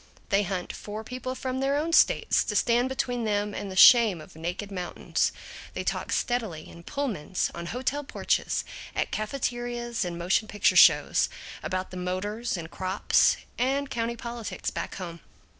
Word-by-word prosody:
They 200 +1 +4
hunt 185 -2 -3
for 215 +1 -7
people 255 +2 -5
from 260 0 -3
their 275 +1 +1
own 325 +3 -1
states - - +4
to - - -3
stand 245 +2 +3
between 245 -2 -1
them 205 -1 0
and 200 - -5
the 190 - -7
shame 220 -2 +8
of 155 - -13
naked 175 +5 -4
mountains; 180 -2 -1 0.4
they - - -2
talk - - -2
steadily, 220 - -1
in 170 - -12
Pullmans, 195 - -2
on 170 0 -6
hotel 260 +7 -2
porches, 275 - 0 0.3
at - - -1
cafeterias 240 0 -2
and 175 -1 -4
motion 185 +5 +1
picture 210 - +2
shows, - - +6 0.3
about 185 0 -3
the 185 - -7
motors 195 +5 -2
and 165 -1 -7
crops 190 +2 +2 0.2
and 270 +2 0
county 235 0 -1
politics 235 -1 -5
back - - -5
home. 170 -3 -6
215 Hz, 160 wpm, -27 LUFS, 185-245 Hz, 0.4 s, shame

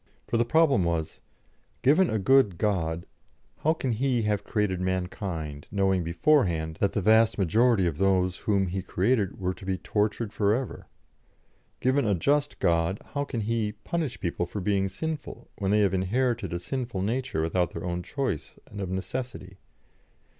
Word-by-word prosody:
For 115 - 0
the 120 - +2
problem 140 - +4
was: 85 -2 -2 0.6
Given 160 +7 +5
a 110 - 0
good 105 -3 +4
God, 85 -5 -1 0.5
how 160 +2 +2
can 135 -5 -2
He 120 0 +1
have 105 -2 0
created 100 -4 -1
mankind, 90 -5 -3
knowing 95 -3 +1
beforehand 85 - +2
that 100 - +2
the 105 - -1
vast 110 +2 +5
majority 110 +2 +3
of 85 -3 -2
those 95 -2 +2
whom 100 -2 +1
He 95 +1 -3
created 100 +2 0
were 90 -1 -1
to - - -14
be 95 0 -1
tortured 105 +2 -1
for 105 0 +2
ever? 130 0 -5 0.9
Given 130 +1 +2
a 100 - +3
just 145 - +1
God, 85 +3 +1
how 145 0 -1
can 120 -5 -3
He 110 -1 -1
punish 135 +6 -3
people 85 0 -2
for 105 - -5
being 95 0 +1
sinful, 155 - -6
when 95 -2 -1
they 105 +1 +4
have 100 -2 +2
inherited 115 +6 0
a 85 - -1
sinful 115 +1 -3
nature 120 -4 -1
without 85 +2 0
their - - -5
own 90 0 -2
choice 95 - -3
and 100 -1 -8
of 95 - -3
necessity? 95 0 -5
100 Hz, 170 wpm, -27 LUFS, 90-120 Hz, 0.9 s, Given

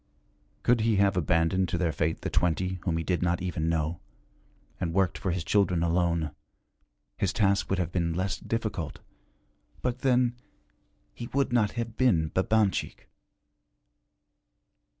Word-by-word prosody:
Could 120 -2 +3
he 110 0 +2
have 100 -1 +3
abandoned 85 +2 +2
to - - -1
their 85 -2 +1
fate 80 +2 -1
the - - -3
twenty 90 +2 0
whom 85 -2 -1
he 80 - -2
did 90 +1 -1
not 90 0 +1
even 80 -3 -2
know, 80 0 -1 0.8
and 85 0 -2
worked 95 -2 +2
for 95 - -3
his 85 -1 -1
children 90 0 +2
alone, 85 -2 +1 0.9
his - - +1
task 100 -2 +1
would 95 - +1
have 90 -2 -1
been 85 -2 -1
less 95 -1 -1
difficult; 110 -7 -3 0.9
but 125 0 -1
then 125 -2 +2 0.8
he 120 - -7
would 140 -2 +1
not 110 -4 +2
have 115 -1 -4
been 85 -12 +3
Babanchik. 100 +2 0
90 Hz, 145 wpm, -28 LUFS, 85-105 Hz, 0.9 s, Could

